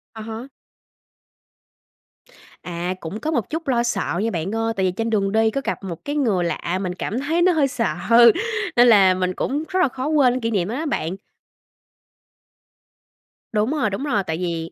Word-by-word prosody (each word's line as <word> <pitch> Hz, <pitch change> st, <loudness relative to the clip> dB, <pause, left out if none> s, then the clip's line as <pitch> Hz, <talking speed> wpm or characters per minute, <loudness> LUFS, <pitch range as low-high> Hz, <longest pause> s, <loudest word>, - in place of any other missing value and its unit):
À 220 Hz, -, -7 dB
há. 225 Hz, +3 st, -7 dB, 2.2 s
À, 175 Hz, +1 st, -3 dB
cũng 180 Hz, +7 st, -6 dB
có 310 Hz, -, -2 dB
một 240 Hz, -10 st, -1 dB
chút 320 Hz, -1 st, -4 dB
lo 240 Hz, -2 st, +2 dB
sợ 195 Hz, -6 st, -1 dB
nha 225 Hz, -, +1 dB
bạn 180 Hz, +5 st, -3 dB
ơi. 225 Hz, 0 st, 0 dB
Tại 190 Hz, -1 st, 0 dB
vì 185 Hz, -, +1 dB
trên 225 Hz, +5 st, -3 dB
đường 200 Hz, -3 st, +1 dB
đi 220 Hz, 0 st, +3 dB
có 275 Hz, -, -2 dB
gặp -, -, -3 dB
một 175 Hz, -4 st, -7 dB
cái 290 Hz, -, -3 dB
người 220 Hz, -11 st, +1 dB
lạ 175 Hz, +1 st, -2 dB
mình 180 Hz, -2 st, -3 dB
cảm 215 Hz, +5 st, -3 dB
thấy 320 Hz, +5 st, 0 dB
nó 365 Hz, -, +5 dB
hơi 305 Hz, -5 st, +2 dB
sợ, 240 Hz, -3 st, -1 dB, 0.8 s
nên 245 Hz, 0 st, +6 dB
là 195 Hz, -5 st, +6 dB
mình 185 Hz, 0 st, -1 dB
cũng 290 Hz, -, -2 dB
rất 375 Hz, -, 0 dB
là -, -, +4 dB
khó 260 Hz, +1 st, -5 dB
quên 285 Hz, -5 st, +4 dB
cái 255 Hz, -, -2 dB
kỷ 230 Hz, -, -1 dB
niệm 190 Hz, -4 st, 0 dB
đó 230 Hz, -, -3 dB
đó 315 Hz, +4 st, -3 dB
bạn. 180 Hz, -, -2 dB, 2.4 s
Đúng 215 Hz, +3 st, 0 dB
rồi, 295 Hz, -8 st, 0 dB
đúng 200 Hz, +7 st, -4 dB
rồi. 230 Hz, -9 st, 0 dB
Tại 160 Hz, -3 st, -3 dB
vì 165 Hz, -2 st, -3 dB
225 Hz, 200 wpm, -22 LUFS, 185-270 Hz, 2.4 s, nên